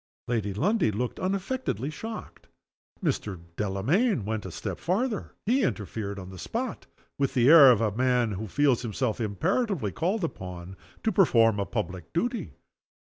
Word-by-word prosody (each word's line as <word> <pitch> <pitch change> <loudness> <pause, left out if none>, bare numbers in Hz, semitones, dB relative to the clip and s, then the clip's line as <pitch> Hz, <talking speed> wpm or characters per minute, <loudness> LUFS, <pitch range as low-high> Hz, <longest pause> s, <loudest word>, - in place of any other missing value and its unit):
'" - - -74
Lady 110 -4 -1
Lundie 180 - +2
looked 120 +4 -3
unaffectedly 190 - -2
shocked. 220 +8 -8 0.6
Mr. 100 -4 -1 0.2
Delamayn 110 - +1
went 110 -2 -3
a - - -7
step - - -5
farther. 215 +5 -1
He 250 +6 +3
interfered 105 - -2
on 95 -1 -8
the 95 - -10
spot 235 +1 -4 0.3
with 140 -1 0
the 125 -1 +4
air 150 -4 +10
of 115 -3 +4
a 105 -2 0
man 125 -2 +2
who 105 +3 -4
feels 135 +3 +2
himself 120 0 -2
imperatively 160 - 0
called 185 - -1
upon 90 - -6 0.3
to 220 - +2
perform 115 - +4
a 100 - -1
public 95 -7 -4
duty. 235 +8 -1
125 Hz, 155 wpm, -27 LUFS, -, 0.6 s, air